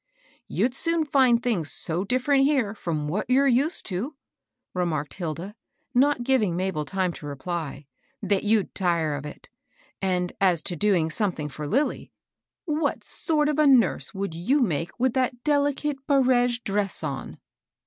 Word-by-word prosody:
" - - -32
You'd 250 - 0
soon 330 +3 0
find 255 -5 +3
things 195 -11 0
so 170 +3 -1
diflferent 255 +5 +2
here 260 -8 +1
fi:om 160 -8 -3
what 200 +10 -2
you're 270 +2 +4
used 275 +6 +2
to," 215 +10 -3 0.6
remarked 165 -5 -2
Hilda, 175 +3 -5 0.4
not 265 0 +3
giving 240 -9 +2
Mabel 180 -4 -2
time 185 -1 -1
to 150 - -9
reply, 145 0 -5 0.2
" 270 -1 -42
that 195 - 0
you'd 215 -1 +1
tire 170 -5 0
of 145 0 -5
it. 150 - -12 0.5
And 180 -2 0
as 180 -4 +3
to 175 - -3
doing 175 -3 +2
something 165 -5 -1
for 150 +1 -6
Lilly, 270 - -1 0.5
what 310 -1 -1
sort 305 -3 0
of 300 0 0
a 305 - +5
nurse 255 -4 +3
would 195 -3 -4
you 195 - +1
make 170 - 0
with 255 0 +2
that 250 -2 -1
delicate 285 -1 0
barege 250 -3 +3
dress 200 -3 0
on 140 -3 -5
210 Hz, 160 wpm, -25 LUFS, 170-265 Hz, 0.6 s, a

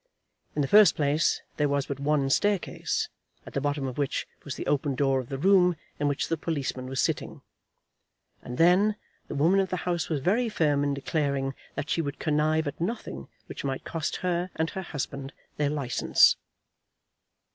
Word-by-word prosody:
In 145 - +1
the - - 0
first 210 +3 +7
place 150 +2 +1
there 150 -1 +2
was 140 -1 +1
but 140 -1 -5
one 140 -1 +1
staircase, 205 +4 0 0.4
at - - -10
the 140 - -1
bottom 145 -1 -1
of 130 +1 -4
which 140 -2 -1 0.2
was 140 - -5
the - - -5
open 145 -1 0
door 135 0 +2
of 125 - -7
the 135 - -3
room 180 +2 +4 0.2
in 145 - +1
which 145 -1 0
the 165 - -1
policeman 140 -5 -3
was 130 0 -3
sitting; - - -1 1.0
and 125 - -7
then, 185 +5 +5 0.3
the - - -5
woman 165 +7 +4
of 190 -1 +1
the 185 - -1
house 175 -2 -1
was 155 -3 0
very 220 - +1
firm 145 -8 +2
in 140 -1 0
declaring 140 -1 -1 0.2
that 145 - -3
she 165 - +2
would 145 -2 -4
connive 155 0 +1
at 145 +3 -5
nothing 170 - -4 0.2
which - - -8
might 135 -1 -3
cost 160 -2 -2
her 175 0 0
and 160 +1 -1
her 190 - -4
husband 140 -5 -5 0.2
their 150 -1 +1
licence. 140 -4 +4
145 Hz, 185 wpm, -27 LUFS, 140-170 Hz, 1.0 s, first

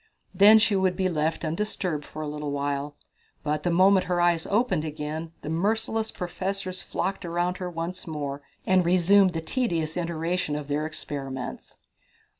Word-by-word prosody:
Then 210 +2 +8
she 215 -1 +3
would 190 -1 +2
be 185 0 +1
left 160 0 -1
undisturbed 170 -2 -2
for 155 - -7
a - - -4
little 150 0 -4
while, 145 0 -2 0.5
but 150 0 -1
the 175 - 0
moment 185 +2 +4
her 180 -1 +1
eyes 175 -2 +2
opened 205 -7 +1
again 155 +1 -4
the - - -4
merciless 220 +6 0
professors 185 +1 -4
flocked 195 +2 -3
about 175 +1 -1
her 180 -1 -3
once 175 +2 -5
more, 145 -3 -4 0.2
and 185 -1 +4
resumed 185 +2 +5
the 165 - -2
tedious 165 -6 -1
iteration 170 -2 -1
of 150 -1 -5
their 150 +2 0
experiments. 135 -4 -6
170 Hz, 160 wpm, -26 LUFS, 150-185 Hz, 0.5 s, Then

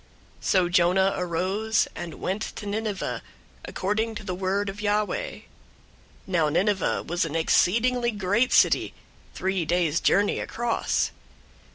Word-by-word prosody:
003:003 - - -13
So 185 -2 +3
Jonah 180 +2 +3
arose, 190 +5 0
and 170 -2 -6
went 195 +3 -3
to - - -7
Nineveh, 205 -1 -3 0.4
according 220 +3 -2
to 210 - -6
the 190 -2 -4
word 190 +2 -1
of 195 +1 -5
Yahweh. 210 - -1 0.8
Now 170 -5 +1
Nineveh 190 +4 +1
was 175 +1 -1
an 165 -1 -4
exceedingly 235 +9 +2
great 210 +3 +1
city, - - +3 0.4
three 190 -1 -1
days' 170 -1 +1
journey 205 +1 +2
across. 235 -1 -1
195 Hz, 130 wpm, -25 LUFS, 180-210 Hz, 0.8 s, So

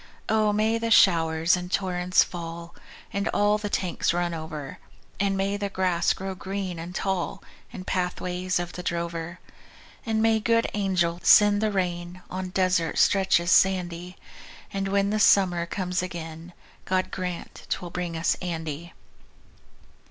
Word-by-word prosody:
Oh, 215 -1 +3
may 220 +2 +1
the 230 0 -2
showers 165 -5 +4
in 180 0 -5
torrents 180 -1 +2
fall, 170 -1 -7 0.4
And 200 +1 -1
all 205 +1 +2
the 210 -1 -4
tanks 175 -3 0
run 175 -1 0
over; 155 -3 -6 0.4
And 195 0 +1
may 195 +1 0
the 200 0 -3
grass 180 -3 +1
grow 190 0 -5
green 190 -2 -5
and 175 +3 -7
tall 190 -3 -2 0.3
In 185 - -7
pathways 180 0 -2
of 175 0 -5
the 180 - -6
drover; 170 0 -4 0.6
And 220 -3 0
may 225 0 +3
good 230 +1 +2
angels 180 -4 0
send 205 0 +7
the 215 -1 +1
rain 180 -1 -3
On 185 0 -4
desert 180 -3 +1
stretches 190 -3 +3
sandy; 180 -1 +2 0.6
And 195 0 -1
when 200 +1 +1
the 215 - 0
summer 180 -4 +4
comes 180 0 -2
again 170 -1 -7 0.3
God 185 0 0
grant 180 -2 -6
'twill 175 -1 -3
bring 175 -2 -3
us 165 - +2
Andy. 165 -2 -5
180 Hz, 145 wpm, -26 LUFS, 170-195 Hz, 0.6 s, send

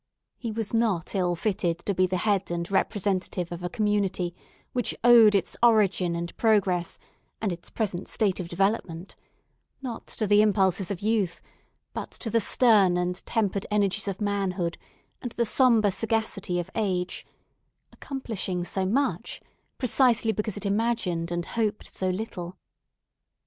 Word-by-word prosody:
He 235 - -5
was 220 -1 -4
not 220 -8 0
ill 180 -3 +1
fitted 175 -2 -1
to 200 - 0
be 185 0 +2
the 185 0 -1
head 200 0 +1
and 170 +1 -3
representative 190 -3 -1
of 175 0 -6
a 175 - -3
community 205 -5 0 0.4
which 245 -2 -1
owed 230 -3 +7
its 190 -3 0
origin 200 -7 +3
and 170 0 -5
progress, 190 -6 +2 0.4
and 205 -4 -1
its 170 - -10
present 195 -5 -3
state 200 -4 0
of 175 -2 -5
development, 185 -1 -1 0.6
not 245 -4 -6
to 220 - -2
the 205 +1 +5
impulses 195 -3 +2
of 200 -2 -4
youth, 210 -5 0 0.5
but - - -5
to 225 - -4
the 230 - +3
stern 205 -5 +4
and 180 0 -2
tempered 205 -3 0
energies 210 0 +1
of 195 -1 -3
manhood 195 -4 -1 0.5
and 245 -3 -5
the 235 - 0
sombre 225 -3 +4
sagacity 205 -4 -1
of 175 +2 -5
age; 185 -5 -2 0.7
accomplishing 220 -9 -4
so 190 +1 -1
much, 275 +8 -1 0.4
precisely 240 -3 +3
because 210 -1 -3
it 205 - -5
imagined 200 -5 0
and 175 0 -2
hoped 215 -2 -2
so 185 - -1
little. 185 -2 -5
200 Hz, 150 wpm, -26 LUFS, 180-220 Hz, 0.7 s, owed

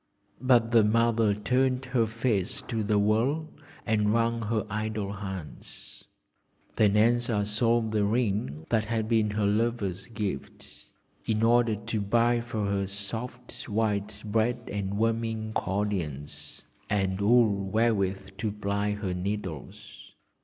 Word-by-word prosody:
But 120 -3 +4
the 115 -2 +6
mother 115 -1 +3
turned 125 +5 +1
her 125 -3 +1
face 115 -1 -1
to 115 -3 -3
the 105 0 +1
wall 115 +10 +1 0.4
and 105 -2 +2
wrung 115 +1 +1
her 110 0 -1
idle 105 -1 -3
hands. 95 -5 -9 0.7
Then 105 -1 +3
Elsa 115 -1 +2
sold 115 +2 +1
the 105 -1 +1
ring 100 - -1
that 110 -2 +2
had 110 0 -1
been 110 -2 +2
her 105 0 0
lover's 105 -3 0
gift 110 -4 -6 0.4
in 110 0 +1
order 120 -1 +4
to 110 +1 -3
buy 120 +4 +2
for 110 -3 -3
her 100 -1 0
soft 115 +7 -6
white 105 -1 -1
bread 115 +3 0
and 100 -1 -2
warming 110 0 -1
cordials, 90 -9 -3 0.3
and 95 -1 0
wool 100 -3 +3
wherewith 100 -3 +1
to 110 0 -1
ply 100 0 -1
her 105 -3 -3
needles. 90 -5 -6
110 Hz, 130 wpm, -28 LUFS, 100-115 Hz, 0.7 s, the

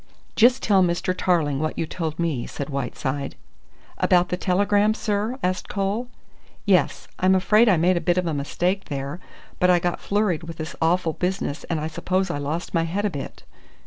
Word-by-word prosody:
"Just 245 +3 +4
tell 200 -3 +4
Mr. 175 0 +1
Tarling 155 -7 +1
what 155 +1 -2
you - - 0
told 160 -1 -4
me," 160 -8 -1
said 140 +1 -6
Whiteside. 140 +1 -3 0.6
"About 180 -1 +3
that 180 - -3
telegram, 205 +3 +2
sir?" 215 +3 -1
asked 185 0 -1
Cole. 200 +5 -1 0.6
"Yes, - - +2
I'm 185 +1 +4
afraid 210 +5 +4
I 185 - +4
made 175 +3 +3
a - - -1
bit 175 0 +1
of 180 - +1
a 165 - -1
mistake 175 +7 -1
there, 140 +2 -5 0.4
but 180 - +4
I 180 - +6
got 175 0 -1
flurried 200 -5 0
with 165 -1 -8
this 155 0 -6
awful 165 0 +2
business 180 -4 -2
and 165 -2 -2
I 150 - -3
suppose 185 +3 -1
I 145 - -3
lost 150 +5 -4
my 165 - +3
head 195 +5 -2
a 205 - 0
bit." 140 -4 -7
175 Hz, 190 wpm, -23 LUFS, 155-195 Hz, 0.6 s, I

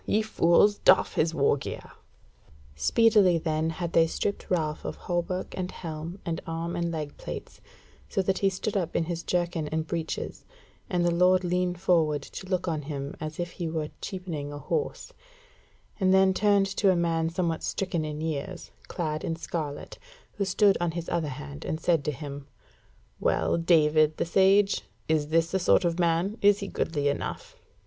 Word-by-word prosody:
Ye 215 +1 +2
fools! 205 0 +3
doff 185 - +5
his 160 +1 +1
wargear." 140 -2 -1 0.8
Speedily 210 - +4
then 160 0 -1
had 170 +1 -4
they 165 0 +5
stripped 200 +5 -3
Ralph 155 -4 -1
of - - -4
hauberk, 175 +1 -2
and 180 -1 -3
helm, 165 +2 -6
and 165 -1 -2
arm 165 +1 -3
and 170 0 -1
leg 150 -3 -4
plates, - - -8 0.5
so 195 - 0
that 190 +1 0
he 195 - +3
stood 195 +3 -3
up 175 -4 -1
in - - +2
his 170 0 -3
jerkin 175 -3 -1
and 160 +1 -2
breeches, 165 -1 -4 0.5
and 175 -1 +1
the 175 - +2
lord 180 +2 +4
leaned 180 0 0
forward 155 -6 +2
to 185 - -9
look 185 -1 -1
on 160 -3 -1
him 140 -1 -5
as 155 +1 -6
if 175 0 -3
he 175 -3 -4
were 160 -2 -3
cheapening 170 -7 -5
a 145 - -6
horse; 460 - -3 0.9
and 190 -2 +3
then 190 0 +5
turned 200 0 +3
to 200 - +4
a 185 - +4
man 165 -1 +1
somewhat 165 -1 -1
stricken 180 -4 -2
in 150 0 -4
years, 160 +3 -4 0.2
clad 155 -2 -3
in 165 - -2
scarlet, 155 -3 -5 0.3
who 200 - -1
stood 195 +1 +3
on 175 - +1
his 170 - -4
other 165 -3 -1
hand, 70 - -8
and 155 - -3
said 165 -3 +2
to 150 - +1
him: 140 0 -8 0.7
"Well, - - +1
David 155 -2 +3
the - - 0
Sage, 195 +3 +4 0.3
is 155 -2 +1
this 165 +1 +2
the 190 - +1
sort 180 0 +3
of 170 +1 0
man? 175 +5 +1
Is 205 0 +5
he 200 - -5
goodly 145 -6 -1
enough?" 145 - -3
170 Hz, 180 wpm, -27 LUFS, 155-185 Hz, 0.9 s, doff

